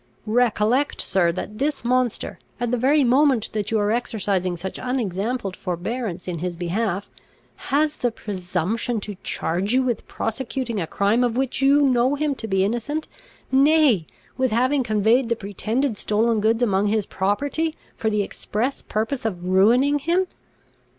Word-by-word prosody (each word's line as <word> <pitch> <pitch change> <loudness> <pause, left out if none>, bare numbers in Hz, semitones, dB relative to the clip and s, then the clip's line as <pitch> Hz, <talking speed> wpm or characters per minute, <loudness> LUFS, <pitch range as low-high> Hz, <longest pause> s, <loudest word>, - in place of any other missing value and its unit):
Recollect, 235 +3 +2
sir, 180 -3 +2
that 210 +4 -6
this 285 -2 -1
monster, 250 -1 0 0.2
at 240 -1 -1
the 245 - +1
very 280 +4 +4
moment 260 -2 +3
that 210 -2 -2
you 225 - +1
are 205 0 +1
exercising 200 -6 -1
such 190 +2 -6
unexampled 225 -4 -2
forbearance 185 +1 -4
in 175 -3 -3
his 175 0 -3
behalf, 195 +3 -2 0.6
has 300 +2 +1
the 245 - +1
presumption 205 +2 -2
to 205 - -6
charge 185 +7 -1
you 260 - +4
with 245 -3 -2
prosecuting 235 0 -3
a 165 - -3
crime 205 +8 +2
of 240 -1 0
which 265 0 -1
you 280 +2 +5
know 260 0 +3
him 295 0 0
to 235 -4 -7
be 190 -2 +2
innocent, 240 +9 -2 0.4
nay, 275 - +4 0.3
with 260 -1 +2
having 255 +5 +2
conveyed 225 +2 +2
the 235 - +2
pretended 220 +5 -2
stolen 220 +1 +1
goods 225 +3 +2
among 200 -2 +2
his 210 -1 +1
property, 285 +11 -1 0.2
for 220 - -1
the 210 -1 +1
express 235 +6 -3
purpose 225 +5 -2
of 180 -5 -3
ruining 245 +10 +4
him. 345 +6 +1
230 Hz, 155 wpm, -23 LUFS, 200-260 Hz, 0.6 s, you